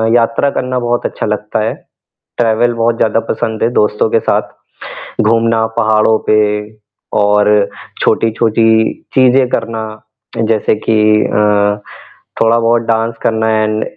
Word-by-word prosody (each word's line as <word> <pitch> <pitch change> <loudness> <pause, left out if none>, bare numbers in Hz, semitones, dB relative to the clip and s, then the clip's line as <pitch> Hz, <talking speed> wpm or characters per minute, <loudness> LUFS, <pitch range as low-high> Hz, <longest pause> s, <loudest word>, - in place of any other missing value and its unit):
यात्रा 115 +4 +1
करना 125 0 -2
बहुत 120 0 -2
अच्छा - - -3
लगता - - -2
है, - - -1 0.6
ट्रैवल 120 +1 +1
बहुत 115 0 0
ज़्यादा 115 0 +1
पसंद 110 -1 -2
है - - +2
दोस्तों 105 0 +1
के 115 - +2
साथ, - - -1 0.7
घूमना 115 0 +2
पहाड़ो 110 0 +3
पे 110 - +4 0.8
और 105 0 +3 0.5
छोटी-छोटी 115 0 +1 0.5
चीज़ें 130 0 +4
करना 115 -2 -3 0.7
जैसे 110 -1 +1
की 110 - +3 0.3
अ, 105 0 +1 0.6
थोड़ा 115 +1 +3
बहुत 115 0 +2
डांस 115 0 -1
करना 110 0 0
एंड 110 0 -1
115 Hz, 125 wpm, -13 LUFS, 110-115 Hz, 0.8 s, पे